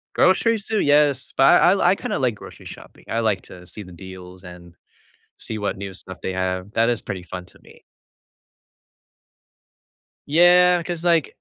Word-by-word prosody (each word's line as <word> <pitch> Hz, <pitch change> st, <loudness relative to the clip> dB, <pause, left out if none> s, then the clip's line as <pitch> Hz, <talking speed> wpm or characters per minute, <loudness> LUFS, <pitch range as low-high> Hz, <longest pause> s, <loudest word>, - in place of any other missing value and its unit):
Groceries 215 Hz, +3 st, +2 dB
too, 220 Hz, -2 st, -1 dB
yes, 145 Hz, -2 st, +2 dB
but -, -, +4 dB, 0.2 s
I 180 Hz, -, +5 dB, 0.2 s
I 195 Hz, -, +2 dB
kinda -, -, -4 dB
like 125 Hz, -4 st, 0 dB
grocery -, -, -13 dB
shopping, -, -, -13 dB
I 115 Hz, +1 st, -2 dB
like 105 Hz, -4 st, 0 dB
to 90 Hz, -1 st, -14 dB
see 100 Hz, +4 st, -9 dB
the 90 Hz, -, -14 dB
deals 90 Hz, +1 st, -12 dB
and 90 Hz, -1 st, -13 dB, 0.6 s
see 110 Hz, -, -7 dB
what 100 Hz, -2 st, -3 dB
new 100 Hz, 0 st, -7 dB
stuff 95 Hz, 0 st, -9 dB
they -, -, -3 dB
have, 95 Hz, +1 st, -3 dB
that 115 Hz, +1 st, +1 dB
is 120 Hz, -2 st, -1 dB
pretty 95 Hz, -4 st, -6 dB
fun 90 Hz, 0 st, -8 dB
to -, -, -19 dB
me. -, -, -19 dB, 2.5 s
Yeah, 175 Hz, +3 st, +5 dB
cause 170 Hz, 0 st, -5 dB
like, 170 Hz, -4 st, +1 dB
110 Hz, 170 wpm, -21 LUFS, -, 2.5 s, I